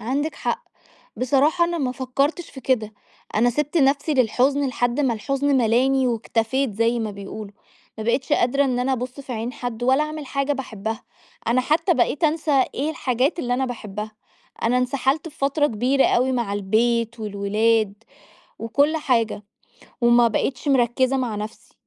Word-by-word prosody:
عندِك 280 +7 -2
حق. - - -3 0.5
بصراحة 285 +7 +3
أنا 340 0 -2
ما 255 -4 -1
فكرتش 275 +6 -1
في 265 - -10
كده. 220 -5 0 0.4
أنا 235 +3 +3
سيبت 295 +6 -2
نفسي 290 +1 +2
للحزن 265 +3 +2
لحد 245 +1 0
ما 260 -5 +2
الحزن 275 +5 0
ملاني 255 +3 +3
واكتفيت 230 +1 0
زي 230 +2 +1
ما 220 -2 -2
بيقولوا، 200 +1 -8 0.5
ما 215 - -4
بقيتش 255 +3 0
قادرة 275 +4 +3
إن 255 -2 0
أنا 255 +2 0
أبص 255 +2 -4
في 265 -2 -7
عين 230 +1 -3
حد 245 -3 -5
ولا 265 +4 +3
أعمل 305 -1 -5
حاجة 275 +2 -1
باحبها. 220 -5 -5 0.5
أنا 250 +2 +3
حتى 330 +7 +2
بقيت 285 +4 +1
أنسى 300 -4 +2
إيه 290 +4 -1
الحاجات 265 +1 0
اللي 245 -6 0
أنا 265 +1 0
باحبّها. 215 -3 -6 0.5
أنا 245 +2 +2
انسحلت 265 +4 0
في 300 - -17
فترة 280 +2 +2
كبيرة 255 +3 +2
أوي 255 +2 +2
مع 235 -5 -1
البيت، 230 +3 0
والولاد، 210 +1 +1 0.7
وكل 285 +7 +1
حاجة، 230 -7 0 0.6
وما 240 0 +5
بقيتش 245 +5 -2
مركزة 260 0 +2
مع 240 -5 -2
نفسي. 210 +1 -8
255 Hz, 160 wpm, -23 LUFS, 230-275 Hz, 0.7 s, وما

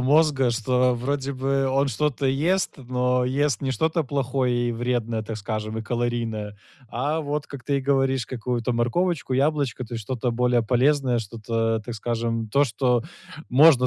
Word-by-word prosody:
мозга, 140 -1 +3
что 125 +2 +2
вроде 135 +3 -2
бы 135 +1 0
он 135 +1 +2
что-то 140 +2 0
ест, 165 +8 +1
но 125 -1 0
ест 135 0 +1
не 135 - 0
что-то 160 +4 +1
плохое 130 -3 0
и - - -1
вредное, 115 -1 -1
так 110 0 -5
скажем, 110 +1 -4
и - - -4
калорийное. 115 -3 -2 0.3
А 145 +7 -1
вот, 145 -1 -3
как 140 -2 -9
ты 140 -1 +1
и - - -3
говоришь, 135 -2 +1
какую-то 120 0 -2
морковочку, 130 +6 0
яблочко, 140 -2 +1
то 120 - -8
есть 115 - -4
что-то 125 +2 -2
более 120 0 +2
полезное, 130 +2 +2
что-то, 115 +1 -1
так 120 - -5
скажем, 115 0 -2
то, 140 +6 +3
что 125 -1 +1 0.5
можно 135 -1 +6
125 Hz, 165 wpm, -24 LUFS, 115-140 Hz, 0.5 s, можно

